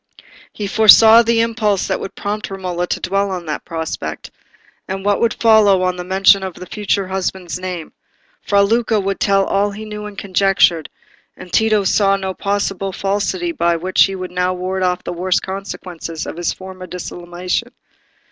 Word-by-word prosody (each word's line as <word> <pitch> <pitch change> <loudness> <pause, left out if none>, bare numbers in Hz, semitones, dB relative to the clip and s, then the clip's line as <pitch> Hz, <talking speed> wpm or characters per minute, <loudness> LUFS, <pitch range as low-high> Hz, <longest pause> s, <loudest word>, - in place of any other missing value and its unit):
He 210 - -5
foresaw 220 +2 +7
the 230 0 +2
impulse 220 -4 0
that - - -1
would - - -7
prompt 210 +1 -4
Romola 180 -2 -3
to - - -2
dwell 195 +2 -1
on 180 -2 -5
that 155 -1 -4
prospect, 160 - -5 0.6
and 190 +1 -5
what 205 -1 +1
would 235 - +1
follow 210 -4 +4
on 180 0 0
the 180 - -6
mention 195 +2 +4
of 190 -2 -5
the 180 - -9
future 200 0 -2
husband's 185 -1 -3
name. 180 -3 -6 0.5
Fra 200 -1 +3
Luca 225 +1 +1
would 195 0 -2
tell 195 -1 +2
all 200 +1 +1
he 210 +2 -8
knew 210 0 -7
and 205 -1 -11
conjectured, 190 -4 +2 0.5
and 180 - -12
Tito 215 -2 +3
saw 195 +1 +3
no 190 -1 -3
possible 195 -1 -2
falsity 205 - -2
by 170 - +1
which 185 +3 +3
he 195 - -4
could 185 -1 -6
now 180 0 0
ward 185 +1 -3
off 180 -1 0
the - - -4
worst 180 +1 0
consequences 185 -4 -6
of - - -6
his 175 0 -1
former 185 -1 -9
dissimulation. 180 +5 -4
195 Hz, 175 wpm, -18 LUFS, 180-205 Hz, 0.6 s, foresaw